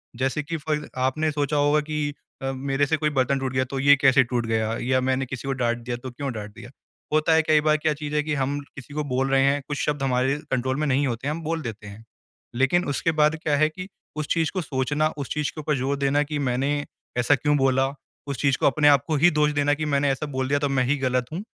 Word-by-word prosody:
जैसे 135 Hz, +4 st, -1 dB
कि 165 Hz, +3 st, -4 dB
फॉर 150 Hz, 0 st, -3 dB
आपने 135 Hz, +5 st, 0 dB
सोचा 145 Hz, 0 st, -1 dB
होगा 145 Hz, +1 st, +3 dB
कि 150 Hz, -1 st, -1 dB, 0.3 s
अ, 135 Hz, 0 st, -2 dB
मेरे 135 Hz, +1 st, 0 dB
से 160 Hz, +3 st, 0 dB
कोई 150 Hz, 0 st, +1 dB
बर्तन 135 Hz, -1 st, +1 dB
टूट 135 Hz, -1 st, -3 dB
गया 130 Hz, 0 st, +2 dB
तो 135 Hz, +1 st, -4 dB
ये 140 Hz, +1 st, +6 dB
कैसे 135 Hz, -1 st, +5 dB
टूट 120 Hz, -1 st, -2 dB
गया 110 Hz, 0 st, 0 dB
या 130 Hz, +1 st, +1 dB
मैंने 130 Hz, +1 st, 0 dB
किसी 130 Hz, +1 st, -7 dB
को 135 Hz, -, 0 dB
डाँट 120 Hz, -2 st, 0 dB
दिया 120 Hz, 0 st, -5 dB
तो 130 Hz, -, -6 dB
क्यों 135 Hz, +2 st, -4 dB
डाँट 105 Hz, -2 st, -7 dB
दिया, 120 Hz, -, -11 dB, 0.4 s
होता 155 Hz, +1 st, +3 dB
है 160 Hz, -, +5 dB
कई 155 Hz, -1 st, +3 dB
बार 155 Hz, 0 st, +3 dB
क्या 155 Hz, 0 st, 0 dB
चीज़ 150 Hz, 0 st, -5 dB
है 150 Hz, -, +2 dB
कि 150 Hz, -, -2 dB
हम 140 Hz, +2 st, -2 dB, 0.2 s
किसी 140 Hz, +1 st, -10 dB
को 150 Hz, -, -2 dB
बोल 135 Hz, +1 st, +1 dB
रहे 135 Hz, 0 st, +3 dB
हैं, 140 Hz, +1 st, +2 dB
कुछ 145 Hz, -, -3 dB
शब्द 145 Hz, -2 st, -1 dB
हमारे 130 Hz, +2 st, +1 dB
कंट्रोल 130 Hz, 0 st, 0 dB
में 155 Hz, -, 0 dB
नहीं 140 Hz, +1 st, +2 dB
होते 120 Hz, +2 st, -3 dB
हैं 150 Hz, -, 0 dB
हम 165 Hz, -, -7 dB
बोल 165 Hz, +1 st, -2 dB
देते 110 Hz, -4 st, -7 dB
हैं। 100 Hz, +2 st, -11 dB, 0.5 s
लेकिन 135 Hz, +8 st, +2 dB
उसके 155 Hz, +4 st, 0 dB
बाद 150 Hz, +1 st, +4 dB
क्या 150 Hz, -2 st, +2 dB
है 155 Hz, +2 st, +3 dB
कि 185 Hz, +4 st, -8 dB, 0.3 s
उस 155 Hz, -1 st, -3 dB
चीज़ 160 Hz, -2 st, +1 dB
को 185 Hz, -, -1 dB
सोचना, 145 Hz, +2 st, 0 dB
उस 140 Hz, -, -5 dB
चीज़ 150 Hz, -2 st, -1 dB
के 155 Hz, -, -7 dB
ऊपर 150 Hz, 0 st, 0 dB
ज़ोर 135 Hz, +2 st, -1 dB
देना 140 Hz, +1 st, +2 dB
कि 150 Hz, 0 st, -4 dB
मैंने 135 Hz, +2 st, 0 dB, 0.4 s
ऐसा 125 Hz, +4 st, +4 dB
क्यों 150 Hz, +2 st, +1 dB
बोला, 135 Hz, -1 st, +2 dB, 0.4 s
उस 140 Hz, -3 st, -3 dB
चीज़ 140 Hz, -2 st, +2 dB
को -, -, -1 dB
अपने 145 Hz, +1 st, +3 dB
आपको 145 Hz, +2 st, +4 dB
ही 175 Hz, +5 st, +6 dB
दोष 150 Hz, 0 st, +2 dB
देना 145 Hz, 0 st, +2 dB
कि 155 Hz, +1 st, -2 dB
मैंने 145 Hz, -1 st, +1 dB
ऐसा 135 Hz, +3 st, -3 dB
बोल 130 Hz, 0 st, -1 dB
दिया 145 Hz, +1 st, +1 dB
तो 145 Hz, -1 st, 0 dB
मैं 135 Hz, -2 st, +2 dB
ही 145 Hz, +3 st, +1 dB
गलत 130 Hz, -2 st, 0 dB
हूँ 185 Hz, +5 st, -4 dB
140 Hz, 260 wpm, -24 LUFS, 130-150 Hz, 0.5 s, ये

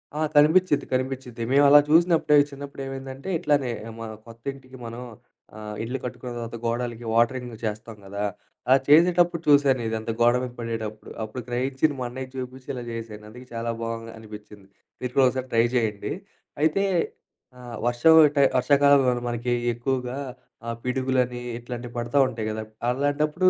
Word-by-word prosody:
ఆ! 150 Hz, -, -3 dB, 0.2 s
కనిపిచిద్ది 155 Hz, +1 st, +4 dB
కనిపిచిద్ది. 130 Hz, -2 st, -3 dB
మేమలా 140 Hz, +1 st, +7 dB
చూసినప్పుడే 165 Hz, -1 st, +4 dB
చిన్నప్పుడు 140 Hz, 0 st, -8 dB
ఏమైందంటే, 135 Hz, +3 st, -7 dB
ఇట్లానే 140 Hz, -5 st, +1 dB, 0.3 s
మా 115 Hz, -, -5 dB, 0.2 s
కొత్త 115 Hz, 0 st, -14 dB
ఇంటికి 130 Hz, -1 st, -14 dB
మనం 115 Hz, +1 st, -7 dB, 0.6 s
ఆహ్, 105 Hz, 0 st, -7 dB
ఇల్లు 125 Hz, +4 st, -3 dB
కట్టుకున్న 125 Hz, 0 st, -6 dB
తర్వాత 115 Hz, 0 st, -6 dB
గోడలకి 120 Hz, 0 st, -2 dB
వాటరింగ్ 120 Hz, +2 st, +1 dB
జేస్తం 110 Hz, 0 st, -4 dB
గదా! 100 Hz, +1 st, -4 dB, 0.4 s
అలా 130 Hz, +1 st, +6 dB
చేసేటప్పుడు 170 Hz, +2 st, +5 dB
చూశానిదంతా 120 Hz, -6 st, +2 dB
గోడ 120 Hz, +1 st, +6 dB
మీద 125 Hz, -, -4 dB
పడేటప్పుడు, 110 Hz, -2 st, -5 dB
అప్పుడు 110 Hz, +4 st, -6 dB
గ్రహించింది 135 Hz, +4 st, 0 dB
మా 125 Hz, -, -2 dB
అన్నయ్యకి 130 Hz, +1 st, -7 dB
చూపించి 130 Hz, 0 st, -7 dB
ఇలా 125 Hz, -2 st, -5 dB
చేసాను, 110 Hz, -2 st, -7 dB
అందుకే 125 Hz, +3 st, -12 dB
చాలా 115 Hz, 0 st, -3 dB
బావుంది 115 Hz, 0 st, -4 dB
అనిపించింది. 105 Hz, -2 st, -12 dB, 0.3 s
మీరు 125 Hz, -1 st, -3 dB
గూడా 135 Hz, -, +6 dB
ఒకసారి 130 Hz, 0 st, -4 dB
ట్రై 115 Hz, 0 st, +5 dB
జేయండి. 110 Hz, -4 st, -1 dB, 0.5 s
అయితే 160 Hz, +6 st, +2 dB, 0.7 s
ఆహ్, 120 Hz, -2 st, -9 dB
వర్షం 120 Hz, +7 st, +5 dB, 0.2 s
టై 140 Hz, -, +6 dB
వర్షాకాలంలో 135 Hz, -2 st, +4 dB
మనకి 120 Hz, +1 st, -2 dB, 0.2 s
ఎక్కువగా 125 Hz, +1 st, -2 dB, 0.5 s
ఆహ్, 115 Hz, -1 st, -3 dB
పిడుగులని 125 Hz, -1 st, 0 dB, 0.2 s
ఇట్లాంటివి 120 Hz, 0 st, -7 dB
పడుత 120 Hz, +2 st, -4 dB
ఉంటాయి 115 Hz, -4 st, -4 dB
గదా! 110 Hz, 0 st, -4 dB, 0.3 s
అలాంటప్పుడు 150 Hz, +7 st, +2 dB
125 Hz, 145 wpm, -25 LUFS, 115-135 Hz, 0.7 s, మేమలా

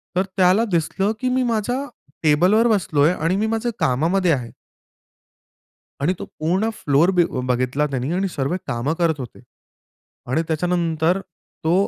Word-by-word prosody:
तर 185 Hz, -, +3 dB
त्याला 190 Hz, +5 st, +4 dB
दिसलं 190 Hz, +5 st, 0 dB
की 255 Hz, -, 0 dB
मी 255 Hz, 0 st, +1 dB
माझ्या 240 Hz, +3 st, -1 dB, 0.4 s
टेबलवर 180 Hz, +10 st, +4 dB
बसलोय 170 Hz, -7 st, +2 dB
आणि 165 Hz, +2 st, 0 dB
मी 215 Hz, -, 0 dB
माझ्या 225 Hz, +2 st, -1 dB
कामामध्ये 165 Hz, +8 st, +2 dB
आहे. 125 Hz, -5 st, -2 dB, 1.5 s
आणि 160 Hz, +6 st, +2 dB
तो -, -, -5 dB
पूर्ण 185 Hz, +8 st, +1 dB
फ्लोर 155 Hz, -1 st, +2 dB
बी 175 Hz, -, +6 dB, 0.2 s
बघितला 130 Hz, +4 st, 0 dB
त्यांनी 135 Hz, +2 st, -3 dB
आणि 195 Hz, +2 st, 0 dB
सर्व 145 Hz, 0 st, -2 dB
कामं 125 Hz, +5 st, -1 dB
करत 160 Hz, -3 st, +1 dB
होते. 125 Hz, -4 st, -8 dB, 0.9 s
आणि 145 Hz, +6 st, +1 dB
त्याच्यानंतर 165 Hz, +1 st, 0 dB, 0.4 s
तो 160 Hz, +2 st, +2 dB
170 Hz, 140 wpm, -21 LUFS, 150-195 Hz, 1.5 s, बी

